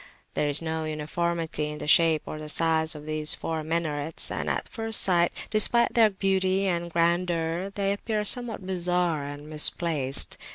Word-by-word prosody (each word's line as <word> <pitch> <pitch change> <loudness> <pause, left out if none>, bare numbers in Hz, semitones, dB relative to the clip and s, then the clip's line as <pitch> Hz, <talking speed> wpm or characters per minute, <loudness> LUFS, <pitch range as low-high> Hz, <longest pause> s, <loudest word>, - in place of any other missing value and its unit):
There 150 - -1
is 145 +3 +3
no 160 0 -3
uniformity 155 0 -3
in 150 - -6
the - - -7
shape 160 0 +4
or 155 - -7
the 155 0 -7
size 160 0 +1
of 150 0 -10
these 155 0 +1
four 160 -1 -4
minarets, 160 -1 -1
and - - -3
at - - -2
first 225 -1 +3
sight, 175 -2 +1
despite 235 +2 +3
their 225 -2 +5
beauty 190 0 0
and 175 -2 -2
grandeur, 170 +1 0
they 200 -1 0
appear 210 +1 -3
somewhat 225 -2 -2
bizarre 175 -4 -1
and 145 +1 -8
misplaced. 150 -2 +1
170 Hz, 165 wpm, -26 LUFS, 155-190 Hz, -, their